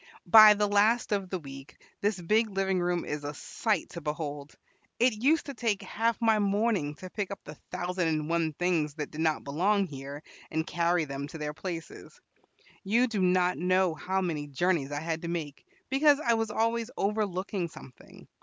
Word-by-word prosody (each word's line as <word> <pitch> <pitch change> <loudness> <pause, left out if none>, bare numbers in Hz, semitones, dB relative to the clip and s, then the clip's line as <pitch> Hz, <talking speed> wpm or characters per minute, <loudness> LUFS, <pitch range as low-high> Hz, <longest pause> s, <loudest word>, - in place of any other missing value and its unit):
By 215 +3 +9
the 210 0 +1
last 210 +4 +3
of 195 -3 -1
the 185 - -2
week 135 -3 -11 0.2
this 205 -1 0
big 215 +6 +2
living 195 -1 0
room 175 0 0
is 150 0 -4
a 145 0 -5
sight 210 - -2
to 170 - -8
behold. 150 -1 -5 0.4
It 235 -3 +2
used 310 +6 +3
to 280 - -6
take 225 -5 -1
half 230 +1 -1
my 225 -2 +3
morning 200 -7 +1
to 185 +5 -9
pick 205 -1 -3
up 200 - -6
the 150 - -9 0.2
thousand 180 -1 -2
and 155 -1 -1
one 165 -1 0
things 160 -3 0
that 150 -3 -5
did 155 - -5
not 160 -1 +1
belong 195 +8 +1
here, 140 -1 -8 0.3
and 160 0 -1
carry 170 -1 +1
them 140 0 -5
to 160 - -9
their 150 -1 -4
places. 165 +1 -7 0.6
You 225 +5 +3
do 220 -5 -2
not 180 0 +2
know 185 0 +2
how 190 +4 -2
many 155 -5 -2
journeys 145 0 0
I 145 0 -3
had 160 0 -3
to 170 - -5
make, 160 -4 -5 0.2
because 285 +1 +5
I 235 -6 +2
was 225 -1 0
always 230 +1 0
overlooking 195 -3 -1
something. 135 -6 -14
180 Hz, 190 wpm, -29 LUFS, 155-210 Hz, 0.6 s, By